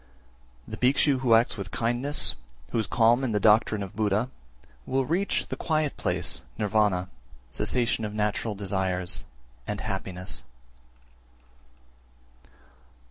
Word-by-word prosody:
368. - - -30
The - - -7
Bhikshu 135 +1 +3
who 125 -3 +4
acts 115 0 +2
with 100 -2 -5
kindness, 120 +8 +2 0.4
who - - 0
is 110 - -1
calm 120 +3 +3
in 120 -4 -1
the 105 - +2
doctrine 110 -1 +4
of 100 +2 -9
Buddha, 105 +3 0 0.6
will 130 0 +1
reach 180 +7 0
the - - -3
quiet 155 -3 -1
place - - -2 0.2
(Nirvana), 105 -4 +1 0.4
cessation 120 - +1
of 105 - -3
natural 105 +1 -1
desires, 95 -2 -1 0.4
and - - -3
happiness. 90 -1 -4
110 Hz, 125 wpm, -27 LUFS, 100-125 Hz, 0.6 s, who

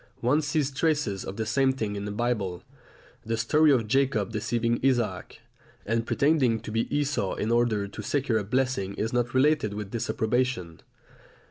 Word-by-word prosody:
One 130 +6 +3
sees 150 -2 0
traces 140 - 0
of 95 - -7
the 110 - -2
same 135 +4 +2
thing 110 -5 -3
in 100 0 -4
the 105 - -4
Bible. 105 -5 -2 0.6
The 115 +1 -2
story 150 +7 +4
of 120 -5 +2
Jacob 125 -5 +1
deceiving 115 +2 0
Isaac, 125 -4 0 0.4
and 115 +2 -1
pretending 140 -6 +2
to - - -7
be 115 +1 -1
Esau 140 -9 0
in 110 - -2
order 115 -4 +1
to 105 - -8
secure 125 0 0
a - - -3
blessing 110 -3 -1
is 110 +2 -2
not 120 +1 0
related 130 -6 +2
with 105 -1 -6
disapprobation. 115 -6 -1
115 Hz, 165 wpm, -27 LUFS, 105-135 Hz, 0.6 s, story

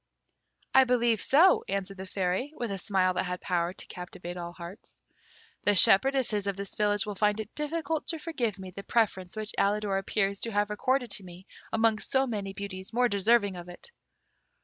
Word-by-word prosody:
"I 265 0 +7
believe 240 -3 +2
so," 335 +7 +5
answered 195 0 -3
the 190 0 -7
Fairy, 190 +10 -2
with 240 -6 -3
a 195 - -3
smile 185 -1 +1
that - - 0
had 180 0 -3
power 175 -1 -1
to 185 - -7
captivate 180 0 -8
all 170 -1 -6
hearts. 175 +3 -11 0.6
"The 205 - +3
shepherdesses 210 +1 +4
of 200 -1 -2
this 200 -1 -5
village 205 -1 +1
will 210 - -4
find 210 +1 +1
it 215 0 -6
difficult 310 0 -2
to 330 - -1
forgive 255 - -2
me 190 -1 -8
the 200 - -8
preference 195 -4 0
which 215 0 -4
Alidor 200 -1 +1
appears 195 0 -1
to 230 - -3
have 205 0 0
accorded 250 +4 0
to 200 - -2
me 180 +1 -12 0.3
amongst 225 -1 +1
so 265 0 +3
many 205 -6 -4
beauties 195 -1 -7
more 245 +1 +3
deserving 205 0 +2
of 175 0 -9
it." 175 - -12
205 Hz, 190 wpm, -28 LUFS, 190-235 Hz, 0.6 s, I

